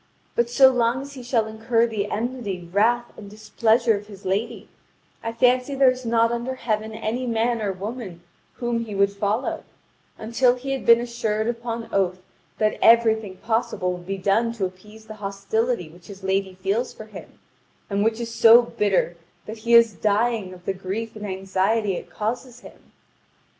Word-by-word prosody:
But 235 0 +1
so 265 +2 +6
long 245 +1 +1
as 280 0 -10
he 265 - -9
shall 240 -2 0
incur 225 +2 +1
the 210 -3 -3
enmity, 215 -6 -4
wrath, 240 +4 +2
and 205 -2 -10
displeasure 220 +2 +1
of 205 +1 -7
his 200 -2 -13
lady, 195 +4 -2 0.5
I 230 - -3
fancy 250 +3 +2
there 270 -1 +5
is 255 -1 -7
not 230 0 +3
under 240 +2 -3
heaven 220 -3 -2
any 225 +3 -3
man 230 0 0
or 205 -2 -1
woman 195 -2 -7 0.3
whom 240 -1 -2
he 210 -3 -7
would 200 0 +3
follow, 205 +5 -2 0.5
until 245 +3 +2
he 265 +2 -5
had 270 -2 -3
been 235 0 +8
assured 225 -2 -2
upon 235 -1 -4
oath 185 -2 +1 0.4
that 215 0 0
everything 220 -4 +4
possible 220 -5 -1
would 175 0 -10
be 195 0 -2
done 210 +5 +1
to 215 -5 -2
appease 210 +4 -11
the 220 - -9
hostility 200 +1 -1
which 170 +2 -17
his 195 -1 -11
lady 190 0 -1
feels 200 +6 -1
for 215 - -11
him, 215 - -12 0.5
and 200 0 0
which 225 +1 +1
is 230 -1 -5
so 230 +1 +7
bitter 200 -6 0 0.3
that 220 +1 -8
he 235 +1 +3
is 230 -2 +6
dying 215 -1 0
of 180 -1 -13
the 195 - 0
grief 195 +5 -5
and 210 -1 -6
anxiety 195 +2 0
it - - -7
causes 245 +3 -4
him." - - -16
220 Hz, 180 wpm, -23 LUFS, 200-235 Hz, 0.5 s, been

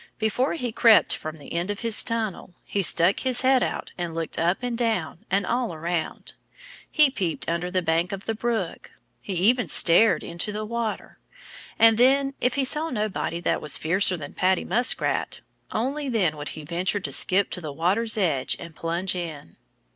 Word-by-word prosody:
Before 225 +7 0
he 250 -7 -3
crept 225 -1 +5
from 155 0 -7
the 145 - -11
end 170 +3 -2
of 205 - -4
his 230 -2 +4
tunnel, 220 -6 -3
he 200 - -2
stuck 175 +1 +3
his 255 -2 +1
head 260 0 +4
out - - -3
and 170 -2 -4
looked 165 -1 -3
up 175 +8 0
and 245 -1 -2
down 220 - -2
and 195 +1 +1
all 235 -4 -1
around. 165 0 -4 0.6
He 300 -3 +4
peeped 180 - -3
under 170 +2 -2
the 185 0 -1
bank 165 +3 0
of 195 0 -6
the 225 - -1
brook. 225 -5 -3 0.3
He 195 - -5
even 220 +5 +2
stared 170 +3 +4
into 170 +5 -4
the 215 +1 -4
water. 230 -1 -4 0.6
And 225 0 +5
then 275 +2 +3
if 250 +1 +1
he 280 - +1
saw 305 +4 +1
nobody 210 - -3
that - - 0
was 150 - 0
fiercer 185 +3 +2
than 145 -3 -8
Paddy 185 0 +1
Muskrat 245 +2 0 0.3
only 275 +5 -2
then 190 -10 +1
would 145 -1 -5
he 155 - -7
venture 180 +6 -1
to - - -4
skip 190 +2 +2
to 180 - -3
the 155 -3 -6
water's 200 +9 0
edge 155 -10 0
and 165 -2 -10
plunge 170 +3 -2
in. 160 - -7
195 Hz, 185 wpm, -24 LUFS, 170-230 Hz, 0.6 s, crept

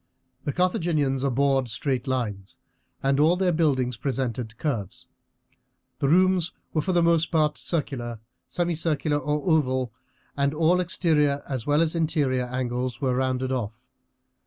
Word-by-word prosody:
The 145 - 0
Carthaginians 155 -6 +1
abhorred 135 0 +2
straight 130 +4 -2
lines, 105 -7 -3 0.5
and 135 +1 +2
all 160 +4 +5
their 185 -1 +2
buildings 135 -7 +1
presented 120 -4 -3
curves. 125 - -3 0.9
The 140 -2 +1
rooms 185 0 +3 0.2
were 155 - +2
for 185 - -1
the 175 -1 +3
most 165 -1 +3
part 150 -2 +2
circular, 125 -8 -3 0.3
semicircular, 160 -3 0
or 150 0 -1
oval, 130 - +1 0.4
and 140 +1 +1
all 165 +3 +3
exterior 150 -5 +1
as 130 -3 -4
well 145 +3 +4
as 160 - 0
interior 145 -6 +1
angles 125 -1 -3
were 130 -2 +1
rounded 130 0 0
off. 120 -1 -4
140 Hz, 135 wpm, -25 LUFS, 130-160 Hz, 0.9 s, all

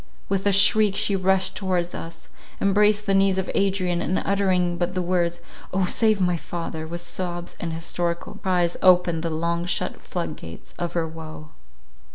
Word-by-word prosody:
With 195 +1 0
a - - +5
shriek 200 +1 +5
she 200 - +2
rushed 190 0 +1
towards 180 -3 -1
us, 165 0 -8 0.3
embraced 210 +1 +3
the 195 - +1
knees 195 -1 +3
of 190 - -2
Adrian, 185 -3 +1
and 185 - 0
uttering 185 -3 +1
but 180 +1 -1
the 185 - 0
words, 175 -1 0 0.3
"O 190 0 +1
save 215 +2 +2
my 180 -2 +2
father!" 165 -1 -5
with 170 +1 -4
sobs 175 0 -3
and 165 - -3
hysterical 170 +1 -3
cries, 180 -3 +1
opened 180 -3 +4
the 165 - -2
long 170 +2 -1
shut - - -2
floodgates 85 0 -7
of 175 -1 -3
her 165 -2 0
woe. 155 -1 -9
180 Hz, 170 wpm, -24 LUFS, 170-195 Hz, 0.3 s, a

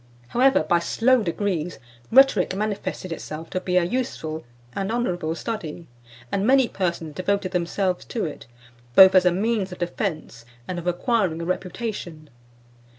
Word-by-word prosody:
However, 260 -5 +4
by 170 +2 +2
slow 245 +8 +2
degrees, 175 -3 -2 0.3
rhetoric 230 -8 +5
manifested 205 -3 -3
itself 160 0 -7
to 185 - -2
be 180 -1 -2
a - - +5
(525) 180 +10 0
useful 160 -9 -6 0.3
and 195 +1 -2
honourable 175 -9 -1
study, 175 -6 -5 0.5
and 195 - 0
many 260 +2 +4
persons 170 -6 -3
devoted 185 +3 -1
themselves 180 +1 -1
to 230 - -3
it, 150 -3 -7 0.5
both 190 0 +9
as 185 -1 +5
a 180 - +5
means 200 +1 0
of 180 - -7
defence 170 - -4 0.2
and 180 -1 -3
of 175 - -7
acquiring 180 -3 0
reputation. 180 -4 -4
185 Hz, 150 wpm, -24 LUFS, 170-215 Hz, 0.5 s, both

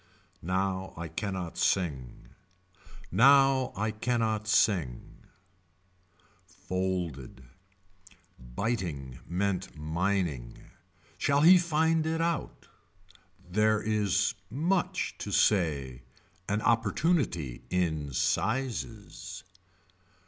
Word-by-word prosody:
Now 95 +1 -2
I 85 0 -5
cannot 95 0 -4
sing. 70 -10 -1 0.8
Now 135 +4 +5
I 110 +2 -1
cannot 110 -1 -1
sing. 85 - 0 1.2
Folded. 90 -9 -4 1.0
Biting 70 - -4
meant 95 -1 -2
mining. 80 -5 -2 0.6
Shall 140 0 +2
he 180 +4 +8
find 160 -1 +1
it 160 0 -1
out. 165 -2 -2 0.8
There 105 +3 +2
is 105 -3 +1 0.2
much 170 - 0
to - - -5
say. 70 - +1 0.5
An 105 +2 0
opportunity 115 - +1
in 80 -5 -1
sizes. 110 - -2
100 Hz, 75 wpm, -29 LUFS, 80-120 Hz, 1.2 s, he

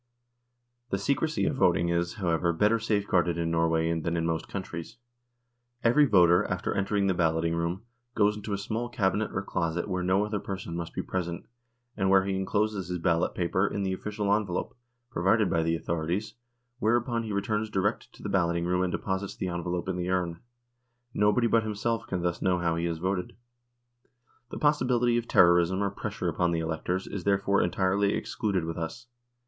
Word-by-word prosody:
The - - 0
secrecy 155 +3 0
of 140 - 0
voting 85 -6 +3
is, 85 +2 0
however, 85 -4 +1
better 105 +7 +3
safeguarded 100 -6 +1
in 85 -1 -1
Norway 80 0 +2
than 85 +1 -2
in 80 - 0
most 80 -1 -1
countries. 95 +2 -6 0.9
Every 125 +6 +5
voter, 90 -5 +5
after - - -2
entering 100 0 0
the 95 - +2
balloting 80 -1 +1
room, 85 +4 -2 0.3
goes 105 -1 +3
into 105 0 -6
a 100 - 0
small 110 +4 -3
cabinet 105 -2 0
or 95 - -2
closet, 85 -2 -2
where 90 -2 -2
no 95 +3 +2
other 105 -1 -2
person 95 -4 -5
must 85 -1 -5
be - - -2
present, 85 -2 -3 0.5
and 95 -2 +1
where 95 0 +5
he 95 -1 -1
encloses 100 0 -1
his 90 0 -2
ballot 85 -1 +1
paper 95 +3 +1
in 100 - -2
the 95 -1 0
official 105 +1 -1
envelope, 100 -4 -1 0.4
provided 100 +1 +2
by 80 - +2
the 80 +1 +1
authorities, 85 +6 -2 0.5
whereupon 120 +1 +1
he 110 -2 -5
returns 105 +2 -1
direct 100 0 -1
to - - -15
the - - -3
balloting 85 -2 +1
room 90 +1 +1
and 90 -1 0
deposits 95 +2 -3
the 95 - -3
envelope 85 +1 -3
in 95 -1 -2
the 90 0 -2
urn. 90 -2 -1 0.7
Nobody 105 +4 +3
but 115 0 +3
himself 110 +1 -2
can 90 -2 -2
thus 85 -1 -1
know 95 -1 +2
how 85 -1 0
he 85 +1 -1
has 85 -1 -1
voted. 90 +2 -2 1.1
The - - -6
possibility 125 -5 +2
of 120 - -7
terrorism 85 +2 +4
or 100 - 0
pressure - - -4
upon 90 - +1
the 85 - 0
electors 80 +3 -2
is 100 -3 -5
therefore 100 0 +2
entirely 95 +3 +1
excluded 95 -6 -1
with 80 0 -4
us. 85 +9 -5
95 Hz, 185 wpm, -28 LUFS, 85-105 Hz, 1.1 s, Every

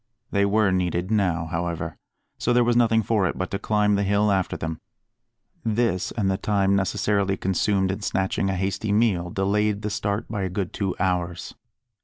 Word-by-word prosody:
They 100 0 +2
were 105 -1 +3
needed 90 +1 -1
now, 90 -6 +1
however, 85 +1 -3 0.4
so 120 - +1
there 120 0 +4
was 120 0 +2
nothing 115 -2 +3
for 105 -2 +1
it - - -3
but 95 - -3
to 100 - -2
climb 105 0 +2
the 100 - +2
hill 100 +1 +2
after 95 -2 0
them. 80 0 -5 0.8
This, 110 -4 0
and 105 -4 0
the 95 0 +1
time 100 -1 +2
necessarily 100 0 +1
consumed 95 +1 +1
in 100 +3 -5
snatching 95 0 0
a 95 - 0
hasty 95 +3 -2
meal, 100 -5 +2
delayed 105 +3 0
the 105 - -2
start 105 -1 -2
by 105 -3 -3
a 95 - -1
good 95 0 -3
two 95 -3 -2
hours. 90 -2 -1
100 Hz, 185 wpm, -24 LUFS, 95-105 Hz, 0.8 s, there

